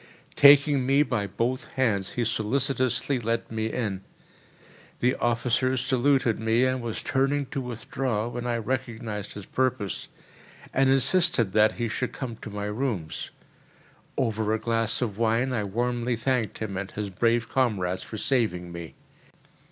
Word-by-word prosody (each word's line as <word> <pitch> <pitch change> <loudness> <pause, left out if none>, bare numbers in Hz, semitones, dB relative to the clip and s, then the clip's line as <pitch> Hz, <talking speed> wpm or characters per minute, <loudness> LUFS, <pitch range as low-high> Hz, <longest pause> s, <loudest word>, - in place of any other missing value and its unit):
Taking 140 -1 +7
me 135 +3 +4
by 120 -7 -1
both 120 +6 -2
hands 105 -8 +1
he 120 - 0
solicitously 130 +3 0
led 115 0 -2
me 110 0 -1
in. 105 -5 -2 1.0
The 125 +1 +3
officer 120 +2 +1
saluted 130 -2 +2
me 110 +3 +2
and 130 0 0
was 115 -2 -4
turning 140 +1 +1
to 135 - -2
withdraw, 120 -1 -3
when 120 0 -4
I 120 -1 0
recognised 115 -3 -4
his 100 -2 -8
purpose, 125 -7 -1 0.6
and 135 0 +3
insisted 135 - +3
that 110 0 +5
he 120 -1 -2
should 125 +3 -3
come 125 -4 -5
to 110 - -9
my 105 0 -4
rooms. 105 -7 -3 0.9
Over 110 -3 0
a - - -3
glass 115 +1 0
of 105 -3 -4
wine 115 +3 +2
I 110 -4 0
warmly 120 +3 -1
thanked 120 -1 -1
him 100 -3 -4
and 95 0 -4
his 105 -1 -5
brave 115 +4 +1
comrades 95 -8 0
for 110 - -7
saving 105 -9 0
me. 85 -1 -8
115 Hz, 150 wpm, -26 LUFS, 110-130 Hz, 1.0 s, Taking